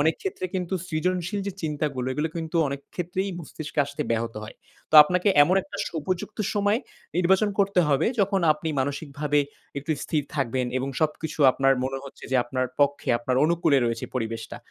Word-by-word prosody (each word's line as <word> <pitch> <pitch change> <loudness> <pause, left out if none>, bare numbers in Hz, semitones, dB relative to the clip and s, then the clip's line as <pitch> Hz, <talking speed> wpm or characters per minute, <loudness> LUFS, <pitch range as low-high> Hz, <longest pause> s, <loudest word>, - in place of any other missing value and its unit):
অনেক 160 +2 +3
ক্ষেত্রে 185 -1 -4
কিন্তু 185 0 -2
সৃজনশীল 180 +4 -1
যে 200 - -2
চিন্তাগুলো 145 -4 -2
এগুলো 150 +4 -1
কিন্তু 165 +1 -3
অনেক 140 0 -4
ক্ষেত্রেই 180 +2 -2
মস্তিষ্কে 155 -1 -8
আসতে 145 +2 -4
ব্যাহত 115 0 -1
হয়। - - -11 0.3
তো - - -2
আপনাকে 180 +6 +1
এমন 175 +5 +3
একটা 200 - -9
উপযুক্ত 170 +6 -4 0.2
সময় 205 +1 +2 0.4
নির্বাচন 190 +4 +3
করতে 195 -2 +3
হবে, 140 -2 +2
যখন 195 0 +2
আপনি 155 +1 -5
মানসিকভাবে 145 +1 -1 0.4
একটু 150 +3 -2
স্থির 150 -2 0
থাকবেন 130 -2 0
এবং 130 +1 -3
সবকিছু 155 +1 -1
আপনার 135 +1 +3
মনে 135 0 -2
হচ্ছে 140 - -11
যে 130 - +3
আপনার 130 +1 -1
পক্ষে 145 0 +2
আপনার 125 +2 -1
অনুকূলে 165 -3 +3
রয়েছে 120 -2 -1
পরিবেশটা। 115 -1 -4
155 Hz, 165 wpm, -25 LUFS, 135-180 Hz, 0.4 s, অনেক